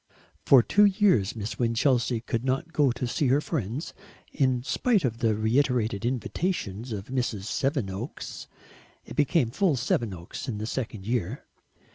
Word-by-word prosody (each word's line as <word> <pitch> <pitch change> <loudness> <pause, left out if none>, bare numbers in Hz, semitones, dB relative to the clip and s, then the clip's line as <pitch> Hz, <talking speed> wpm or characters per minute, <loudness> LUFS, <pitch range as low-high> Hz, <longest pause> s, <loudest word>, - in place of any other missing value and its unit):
For 130 -4 +8
two 205 - +5
years 190 - +3
Miss 110 0 -5
Winchelsea 120 0 +1
could 115 0 -2
not 135 +6 -1
go 145 -4 +3
to 125 +1 -3
see 125 +4 0
her 135 +3 +4
friends, 145 - -3 0.4
in 130 -3 +1
spite 205 - +1
of 115 -2 -2
the 115 -3 +2
reiterated 115 -1 +1
invitations 125 - -2
of 100 0 -5
Mrs. 120 -6 -2
Sevenoaks 115 -1 -3 0.6
it - - -9
became 140 -4 +2
full 185 0 +2
Sevenoaks 115 -6 -2
in 115 -5 -3
the 105 - -4
second 110 -4 -4
year. 120 +1 -2
125 Hz, 145 wpm, -27 LUFS, 110-140 Hz, 0.6 s, For